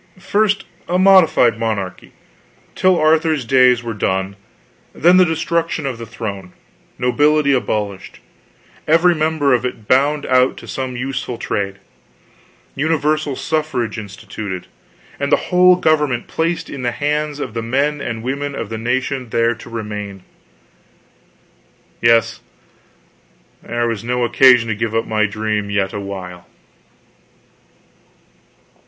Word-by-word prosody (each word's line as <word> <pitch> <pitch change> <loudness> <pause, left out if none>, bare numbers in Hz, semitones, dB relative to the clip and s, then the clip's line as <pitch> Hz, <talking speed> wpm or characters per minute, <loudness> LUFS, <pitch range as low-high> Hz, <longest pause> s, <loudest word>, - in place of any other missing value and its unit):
First, 200 +1 0 0.2
a 180 - 0
modified 180 - +5
monarchy, 100 -5 -4 0.6
till 185 -1 +2
Arthur's 155 -3 +2
days 125 0 +4
were 115 -1 -4
done, 95 -1 -2 0.6
then 175 +3 +5
the 185 - +6
destruction 165 -1 -1
of 130 -4 -4
the 115 - -7
throne, 100 -5 -6 0.4
nobility 145 +4 +2
abolished, 105 -6 -3 0.7
every 165 +3 +4
member 155 -3 +1
of 120 -1 +1
it 115 -4 -5
bound 145 +3 +2
out 130 0 +2
to - - -11
some 130 -2 -4
useful 130 -1 -4
trade, 100 -3 -3 1.0
universal 155 -1 0
suffrage 130 -10 -2
instituted, 100 -2 -7 0.5
and 140 +1 -2
the - - +7 0.2
whole 180 0 +6
government 150 -8 +1
placed 165 +1 -2
in 140 - -7
the 120 -1 -1
hands 150 +1 -2
of 125 -6 -5
the 115 - -3
men 140 +5 -1
and 115 -3 -5
women 140 +2 -3
of 110 - -5
the 110 -1 -5
nation 130 +2 -2
there 115 +1 +1
to 120 +1 -12
remain. 105 -4 -6 1.8
Yes, 115 -1 +3 1.2
there 120 0 -2
was 115 -2 -3
no 125 +1 -1
occasion 125 0 +5
to 110 - 0
give 115 +1 -3
up 115 - +1
my 105 -1 +1
dream 105 -1 -2
yet 100 -1 -1
a 105 - -4
while. 90 -3 -8
125 Hz, 130 wpm, -18 LUFS, 110-150 Hz, 1.8 s, the